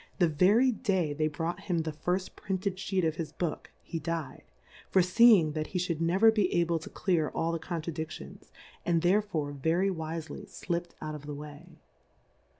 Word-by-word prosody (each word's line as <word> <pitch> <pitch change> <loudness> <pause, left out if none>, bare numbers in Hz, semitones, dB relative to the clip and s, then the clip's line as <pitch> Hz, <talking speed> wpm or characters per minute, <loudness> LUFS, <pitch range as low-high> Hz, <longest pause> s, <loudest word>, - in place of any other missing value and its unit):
The 175 - +4
very 200 - +4
Day 190 - 0
they 155 +1 +1
brought 165 +3 -3
him 175 -5 -1
tlie 155 -1 -4
tirll 180 +4 -2
printed 190 -1 -3
Sheet 190 -2 0
of 160 0 0
his 160 -3 -4
Book, 165 -2 -3
he 165 - -4
dyM; 165 0 -4 0.5
forefeeing 185 -2 +6
that 155 0 -3
he 180 - -4
fliould 175 -3 -1
never 190 +7 +5
be 210 -4 +1
able 170 -1 +2
to 160 - -9
clear 170 -6 0
all 165 +1 -1
the 165 - -2
Contradiftions, 160 -2 -6 0.3
and 170 -1 +1
thereiore 175 -6 +1
very 165 +7 +1
wifely 160 -1 -5
Dipt 175 0 -4
out 155 0 -4
of 150 -1 -8
the 145 - -5
way. 150 +4 -10
170 Hz, 170 wpm, -30 LUFS, 155-185 Hz, 0.5 s, forefeeing